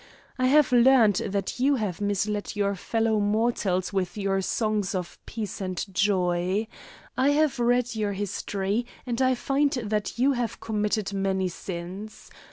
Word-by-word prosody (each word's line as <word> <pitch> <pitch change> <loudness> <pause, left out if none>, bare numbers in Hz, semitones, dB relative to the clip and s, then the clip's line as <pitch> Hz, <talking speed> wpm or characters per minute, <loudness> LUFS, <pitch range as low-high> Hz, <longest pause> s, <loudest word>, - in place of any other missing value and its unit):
I 255 - +3
have 290 0 +5
learned 240 -5 +5
that 200 +2 -2
you 275 +3 +3
have 205 -7 -3
misled 205 +1 -1
your 200 -1 +1
fellow 225 +3 0
mortals 205 -3 0
with 190 0 -1
your 195 -1 0
songs 210 0 -1
of 180 -2 -5
peace 215 -3 -5
and 185 -2 -3
joy. 185 +1 +1 0.5
I 265 +2 +3
have 295 -3 +2
read 245 0 +2
your 210 -2 -1
history, 200 +2 -2 0.2
and 240 0 -2
I 260 0 +3
find 280 +3 +1
that 215 -4 -2
you 260 +4 +3
have 245 -4 -2
committed 210 -2 -1
many 190 -1 0
sins. 185 +4 -7
210 Hz, 150 wpm, -26 LUFS, 195-240 Hz, 0.5 s, have